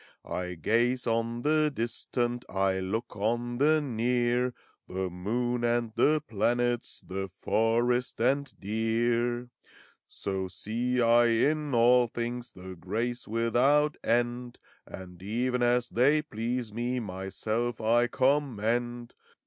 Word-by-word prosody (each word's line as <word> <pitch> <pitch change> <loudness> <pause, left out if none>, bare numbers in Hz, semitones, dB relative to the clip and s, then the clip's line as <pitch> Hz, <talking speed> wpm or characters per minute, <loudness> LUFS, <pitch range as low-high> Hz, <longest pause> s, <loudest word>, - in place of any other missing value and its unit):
I 90 0 -4
gaze 120 - +1
on 115 +1 -1
the 155 0 +3
Distant, 120 0 -2
I 95 -1 +1
look 100 +5 -3
on 120 +4 -1
the 155 +2 +4
Near, 125 -1 +1 0.2
— - - -38
The 95 0 -3
moon 120 +7 -2
and 120 -1 +1
the 150 +7 +3
planets. 120 +3 0
232 - - -34
FAUST. - - -23 0.3
The - - -25
forest 120 +3 +1
and 135 +3 0
deer. 120 +3 0 0.6
So 95 -1 -3
see 120 +7 -2
I 120 +1 +5
in 145 +4 +1
all 120 +1 +5
things 120 +1 -4
The 95 0 -9
grace 115 +8 -3
without 125 +7 +2
end, 120 +1 0 0.3
And 90 -1 -10
even 125 +5 -1
as 120 0 +2
they 145 +6 +3
please 115 -2 -3
me, 120 +2 -1
Myself 110 +3 -3
I 120 +2 +3
commend. 120 -3 0
120 Hz, 125 wpm, -29 LUFS, 110-125 Hz, 0.6 s, I